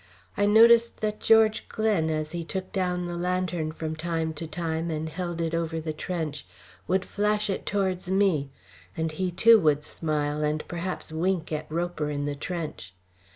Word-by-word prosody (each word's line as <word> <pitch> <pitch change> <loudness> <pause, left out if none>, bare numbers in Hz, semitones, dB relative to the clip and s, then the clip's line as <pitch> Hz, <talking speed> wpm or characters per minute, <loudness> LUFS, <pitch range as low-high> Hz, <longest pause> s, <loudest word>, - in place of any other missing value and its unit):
I 205 - +2
noticed 230 +2 +6
that 215 0 -1
George 220 -1 +4
Glen, 210 -8 +1
as 155 -1 -2
he 170 -1 -3
took 185 +3 -5
down 180 -2 -1
the 175 0 -4
lantern 180 -2 -1
from 160 0 -4
time 160 0 -2
to 160 +2 -6
time 165 +1 -2
and 160 0 -2
held 175 +1 -4
it 165 -1 -1
over 165 -1 -1
the 155 -1 -4
trench, 155 -3 -4 0.4
would 185 +1 +1
flash 210 0 0
it - - -4
towards 190 -3 -1
me; 190 -8 +2 0.5
and 160 0 -1
he, 185 +4 -1
too, 220 +6 +6
would 150 -4 +2
smile 150 -1 -2
and 150 +1 -1
perhaps 175 -1 -4
wink 170 +1 -1
at 155 0 -3
Roper 170 -2 -2
in 145 -1 -2
the 145 - -1
trench. 150 - -5
170 Hz, 175 wpm, -27 LUFS, 155-190 Hz, 0.5 s, noticed